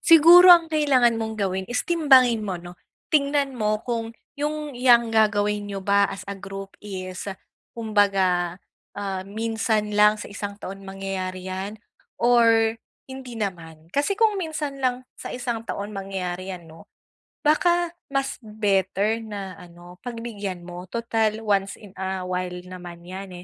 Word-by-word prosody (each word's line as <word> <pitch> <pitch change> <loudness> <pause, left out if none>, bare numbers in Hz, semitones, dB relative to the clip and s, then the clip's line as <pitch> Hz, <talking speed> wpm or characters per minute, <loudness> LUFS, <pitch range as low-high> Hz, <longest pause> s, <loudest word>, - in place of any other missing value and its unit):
siguro 335 +2 +8
ang 335 -1 0
kailangan 260 -7 +3
mong 220 0 -3
gawin 190 -1 -1
is 245 +1 -1
timbangin 260 -9 +4
mo, 190 - -2
'no? 175 +1 -11 0.3
Tingnan 280 -2 +2
mo 215 0 0
kung 230 -2 -3 0.2
yung 300 -1 -3
'yang 235 -2 +5
gagawin 210 -1 +2
n'yo 200 -1 -5
ba 200 +1 +4
as 195 -1 -7
a 200 - -5
group 195 0 -8
is 185 -3 -7 0.5
kumbaga, 195 -6 +1 0.4
ah, 195 -2 -3
minsan 220 0 -1
lang 210 0 +5
sa - - -8
isang 200 0 -5
taon 195 +1 -7
mangyayari 190 -1 -5
'yan 190 +3 -4 0.5
or 230 -2 +4 0.3
hindi 260 -2 -8
naman? 165 -7 -6
Kasi 285 - +1
kung 425 -1 +2
minsan 310 -5 -4
lang 255 -1 0 0.2
sa - - -6
isang 240 -3 -4
taon 200 +1 -4
mangyayari 190 -2 -4
'yan, 170 -2 -12
'no, 160 +1 -15 0.6
baka 345 +2 +3 0.2
mas 275 -1 -2
better 210 0 0
na 200 -4 -6
ano 175 +1 -14
pagbigyan 215 -7 -6
mo 180 +1 -9
total 225 -1 -1
once 200 -1 +1
in 200 -3 -14
a 190 -1 -4
while 180 0 -3
naman 175 -2 -10
'yan 190 +1 -7
210 Hz, 145 wpm, -24 LUFS, 190-245 Hz, 0.6 s, siguro